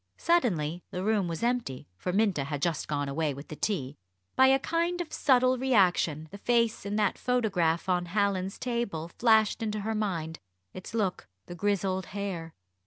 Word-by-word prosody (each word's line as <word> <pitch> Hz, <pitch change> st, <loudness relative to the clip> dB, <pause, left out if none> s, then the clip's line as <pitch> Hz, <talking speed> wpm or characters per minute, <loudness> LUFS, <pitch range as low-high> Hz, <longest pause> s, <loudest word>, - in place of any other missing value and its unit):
Suddenly 180 Hz, -, +1 dB
the 185 Hz, -2 st, -4 dB
room 210 Hz, -3 st, +1 dB
was 165 Hz, +5 st, -4 dB
empty, 235 Hz, -, -1 dB
for 180 Hz, -, -3 dB
Minta 195 Hz, -8 st, +1 dB
had 145 Hz, 0 st, -3 dB
just 170 Hz, -3 st, -1 dB
gone 145 Hz, -1 st, -1 dB
away 145 Hz, 0 st, -1 dB
with 140 Hz, +2 st, -10 dB
the 155 Hz, -, -6 dB
tea 145 Hz, -8 st, -2 dB, 0.4 s
by 265 Hz, -, +6 dB
a 265 Hz, 0 st, +5 dB
kind 335 Hz, +5 st, -1 dB
of 340 Hz, -3 st, -5 dB
subtle 255 Hz, -2 st, +3 dB
reaction, 180 Hz, -, +2 dB
the 200 Hz, -, -9 dB
face 230 Hz, -2 st, +1 dB
in 205 Hz, -, -2 dB
that 210 Hz, -2 st, +1 dB
photograph 190 Hz, -10 st, +1 dB
on 180 Hz, -1 st, +1 dB
Hallin's 195 Hz, 0 st, 0 dB
table 235 Hz, -10 st, -3 dB
flashed 220 Hz, -3 st, +4 dB
into 215 Hz, -1 st, -2 dB
her 220 Hz, +2 st, -2 dB
mind 170 Hz, -7 st, -2 dB, 0.3 s
its 185 Hz, +4 st, -8 dB
look 195 Hz, -, -1 dB, 0.2 s
the -, -, -8 dB
grizzled 190 Hz, 0 st, -1 dB
hair. 175 Hz, -5 st, -4 dB
200 Hz, 175 wpm, -29 LUFS, 165-230 Hz, 0.4 s, by